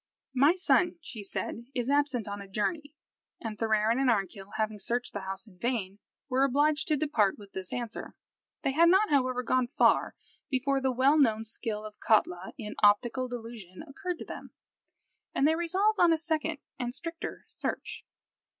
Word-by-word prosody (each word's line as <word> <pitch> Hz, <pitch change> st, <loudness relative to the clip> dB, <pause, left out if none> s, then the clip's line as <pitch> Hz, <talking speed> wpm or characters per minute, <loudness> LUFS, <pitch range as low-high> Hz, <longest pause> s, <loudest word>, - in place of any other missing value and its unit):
"My 280 Hz, +6 st, +5 dB
son," 360 Hz, -1 st, +3 dB
she 260 Hz, -9 st, -8 dB
said, 225 Hz, +3 st, -5 dB
"is 245 Hz, -1 st, -1 dB
absent 285 Hz, -6 st, +1 dB
on 200 Hz, 0 st, -5 dB
a 200 Hz, -, -9 dB
journey;" 290 Hz, -, -2 dB, 0.4 s
and 220 Hz, -2 st, -5 dB
Thorarin 220 Hz, +2 st, +2 dB
and 270 Hz, -1 st, +3 dB
Arnkill, 195 Hz, -2 st, -1 dB
having 215 Hz, -1 st, -1 dB
searched 240 Hz, +4 st, -2 dB
the 205 Hz, -, -3 dB
house 195 Hz, +2 st, -5 dB
in 185 Hz, -5 st, -19 dB
vain, 210 Hz, -5 st, -2 dB, 0.3 s
were 265 Hz, 0 st, +2 dB
obliged 290 Hz, +2 st, +2 dB
to 305 Hz, -3 st, +2 dB
depart 240 Hz, -10 st, +2 dB
with 200 Hz, -2 st, -13 dB
this 190 Hz, -1 st, -6 dB
answer. 240 Hz, -2 st, -5 dB, 0.5 s
They 270 Hz, -, +2 dB
had 335 Hz, +5 st, +5 dB
not, 385 Hz, +2 st, +4 dB
however, 255 Hz, -3 st, +2 dB
gone 255 Hz, 0 st, +2 dB
far 275 Hz, -, +3 dB, 0.3 s
before 270 Hz, 0 st, +1 dB
the 265 Hz, 0 st, +2 dB
well 270 Hz, +5 st, +4 dB
known 225 Hz, -5 st, +3 dB
skill 220 Hz, -1 st, -4 dB
of 210 Hz, 0 st, -10 dB
Katla, 185 Hz, -4 st, +2 dB
in 210 Hz, -5 st, -6 dB
optical 235 Hz, +5 st, +4 dB
delusion 230 Hz, -, -8 dB
occurred 360 Hz, +5 st, -4 dB
to -, -, -8 dB
them, -, -, -8 dB, 0.9 s
and 275 Hz, -, +4 dB
they 315 Hz, -, +4 dB
resolved 380 Hz, +6 st, +1 dB
on 345 Hz, -1 st, +6 dB
a 325 Hz, -, +4 dB
second 315 Hz, -1 st, -1 dB, 0.2 s
and 245 Hz, 0 st, -3 dB
stricter 330 Hz, 0 st, -6 dB
search. -, -, -5 dB
250 Hz, 175 wpm, -29 LUFS, 215-295 Hz, 0.9 s, on